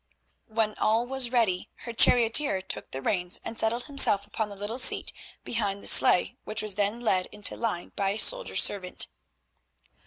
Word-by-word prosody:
When 220 -1 -1
all 225 +2 +1
was 260 -1 -1
ready 220 -8 0 0.2
her 235 - -6
charioteer 230 -2 +4
took - - -5
the 135 0 -7
reins 180 -4 -1
and 225 - -4
settled 235 +2 0
himself 275 -9 +2
upon 210 +1 -4
the 200 - -9
little 205 +5 -5
seat 260 - +3 0.3
behind 205 -4 -3
the - - -5
sleigh, 180 - +5
which 215 0 -4
was 215 -2 -2
then 205 +4 -1
led 185 -6 +1
into 210 -1 -2
line 215 -7 -4
by 195 -1 -1
a 200 - -3
soldier - - 0
servant. 185 -3 +1
215 Hz, 175 wpm, -26 LUFS, 200-235 Hz, 0.3 s, sleigh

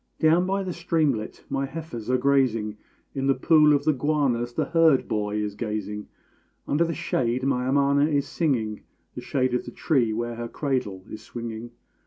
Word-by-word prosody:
Down 165 +3 +4
by 195 +1 0
the 185 -2 -4
streamlet 155 -10 -1
my 135 0 -2
heifers 135 -8 -7
are 130 - +3
grazing; 125 -6 +1 0.4
In 135 -1 -2
the 135 - +4
pool 150 +2 +5
of 145 -1 +3
the 155 - +4
guanas 135 -4 0
the - - +1
herd 165 -5 +3
boy 105 -1 -1
is 105 -1 -2
gazing; 105 -1 -4 0.6
Under 150 +4 +2
the 165 0 -2
shade 130 -7 -1
my 130 -2 0
amana 140 +1 +3
is 145 -3 0
singing 115 -10 -1 0.3
The - - -7
shade 130 -2 0
of 125 - 0
the - - -6
tree 120 -2 +1
where 120 +1 -3
her 120 0 -4
cradle 115 -9 -2
is 110 - -7
swinging. 115 0 -7
130 Hz, 180 wpm, -25 LUFS, 115-150 Hz, 0.6 s, pool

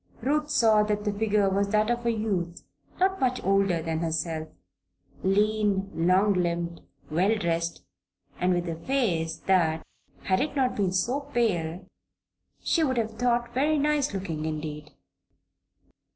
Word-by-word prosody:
Ruth 295 +4 0
saw 220 -7 +4
that 210 0 -1
the 205 - 0
figure 210 -1 +2
was 200 +1 +1
that 215 +2 +2
of 240 0 -1
a - - +4
youth 195 -6 -2 0.4
not 380 +1 +2
much 255 -1 +1
older 195 -3 +2
than 160 0 -2
herself 160 -1 -2 0.7
lean, 205 0 +1
long 185 +5 +3
limbed, 170 -2 -1 0.3
well 190 +8 +2
dressed, 170 -3 -2 0.6
and 180 +1 +2
with 175 -1 0
a 165 - -2
face 185 -12 0
that, 165 -4 +2 0.4
had 185 -1 +1
it 300 -1 -2
not 260 -2 +1
been 195 -3 0
so 235 +9 0
pale, 205 - -1 0.8
she 330 - +2
would 260 -4 0
have 220 -1 -2
thought 240 -1 +1
very 300 +4 +2
nice 295 -1 +1
looking 175 -6 -4
indeed. 150 -1 -5
200 Hz, 145 wpm, -27 LUFS, 170-235 Hz, 0.8 s, saw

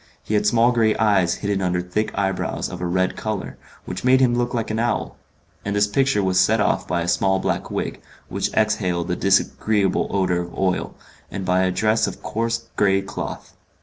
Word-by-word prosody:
He - - -4
had 105 0 +2
small 115 +2 +4
grey 115 -3 +2
eyes 100 -6 +2
hidden 100 -1 -2
under 90 -1 0
thick 90 +5 -2
eyebrows 95 -1 -1
of 90 -1 -7
a 90 - -1
red 95 +1 0
colour, 110 -2 -4 0.3
which 90 - -6
made 130 +1 +5
him 125 -2 +3
look 120 0 0
like 115 -3 -2
an 110 - -1
owl; 120 -2 -1 0.5
and 100 0 -2
this 105 0 +4
picture 105 0 +1
was 95 -1 +2
set 110 +3 +3
off 105 - +1
by 85 +1 0
a - - -4
small 95 +2 +2
black - - -2
wig, - - -4 0.3
which - - -2
exhaled 95 -5 0
a - - +1
disagreeable 100 +1 +1
odour 95 -3 +1
of 85 0 -6
oil, 95 -1 -1 0.3
and 95 - -5
by 90 0 +2
a 95 - +2
dress 110 +3 +1
of - - -7
coarse 115 +1 -2
grey 95 -1 +2
cloth. 95 - -6
100 Hz, 200 wpm, -22 LUFS, 95-110 Hz, 0.5 s, made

